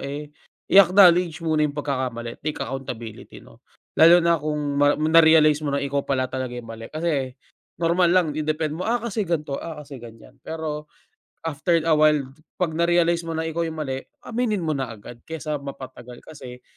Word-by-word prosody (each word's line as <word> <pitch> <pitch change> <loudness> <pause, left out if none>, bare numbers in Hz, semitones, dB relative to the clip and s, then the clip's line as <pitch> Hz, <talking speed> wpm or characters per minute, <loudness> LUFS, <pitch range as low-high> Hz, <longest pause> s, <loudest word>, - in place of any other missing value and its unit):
eh, 145 +2 -6 0.4
i-acknowledge 180 -3 +6
muna 155 -2 +2
yung 145 - -9
pagkakamali, 130 -5 -4
take 155 0 -3
accountability 125 -4 -7
'no. - - -19 0.4
Lalo 165 +2 +9
na 170 0 +4
kung 150 -1 -2
ma 145 0 +4
na-realize 155 -1 +5
mo 150 - -2
na 140 - +1
ikaw 140 0 -1
pala 130 -2 -1
talaga 130 -1 -3
yung 120 -1 -8
mali. 115 0 -8
Kasi 155 -5 -1 0.5
normal 170 +1 +2
lang 180 -1 +4
i-defend 155 0 -2
mo, - - -1
"Ah, 240 +1 +2
kasi 230 -2 -2
gan'to. 150 -4 -2
Ah, 160 -2 -7
kasi 140 -3 -10
ganyan." 115 +2 -13
Pero 155 -2 -5 0.6
after 165 +2 0
a 165 -1 +3
while, 150 -2 +4 0.3
'pag 175 -3 -1
na-realize 170 0 +2
mo 165 - -4
na 160 - -1
ikaw 160 +1 -2
yung 160 - -7
mali 135 -2 -3 0.2
aminin 225 -5 -1
mo 160 - -1
na 135 -4 -3
agad 115 +3 -12
kaysa 155 -2 -4
mapatagal 130 -3 -10
kasi, 125 -4 -11
150 Hz, 175 wpm, -23 LUFS, 135-165 Hz, 0.6 s, Lalo